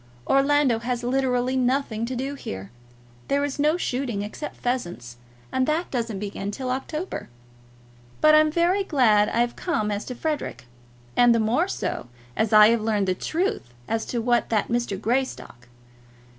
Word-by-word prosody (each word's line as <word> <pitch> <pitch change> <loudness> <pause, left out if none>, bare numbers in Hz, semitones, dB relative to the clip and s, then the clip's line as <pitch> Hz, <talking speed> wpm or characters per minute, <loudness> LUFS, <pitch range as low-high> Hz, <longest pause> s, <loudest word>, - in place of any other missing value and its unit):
Orlando 275 -3 +3
has 245 +1 -3
literally 255 0 +1
nothing 250 -3 0
to 255 - -4
do 270 +3 -3
here. 100 - -7 0.6
There 280 +1 +1
is 285 0 -3
no 305 +3 +3
shooting, 245 - -2
except 215 +8 -6
pheasants, 175 - -3 0.3
and 260 0 +1
that 315 +3 -1
doesn't 230 -5 -2
begin 200 0 -4
till 255 +4 -4
October. 305 +7 -4 0.9
But 310 0 +6
I'm 310 0 +5
very 350 +5 +2
glad 225 - +3
I've 240 +1 0
come 215 - -1
as 205 0 -2
to 250 - -6
Frederic, 300 - -3 0.5
and 240 -1 +5
the - - +2
more 240 +11 +2
so, 255 - -3 0.3
as 220 - 0
I 215 0 +8
have 230 -1 +2
learned 210 -3 0
the - - +3
truth 315 - -2
as 225 0 -2
to 240 - -2
that 235 -3 +1
Mr. 235 -5 -1
Greystock. 225 - -2
245 Hz, 155 wpm, -24 LUFS, 215-280 Hz, 0.9 s, I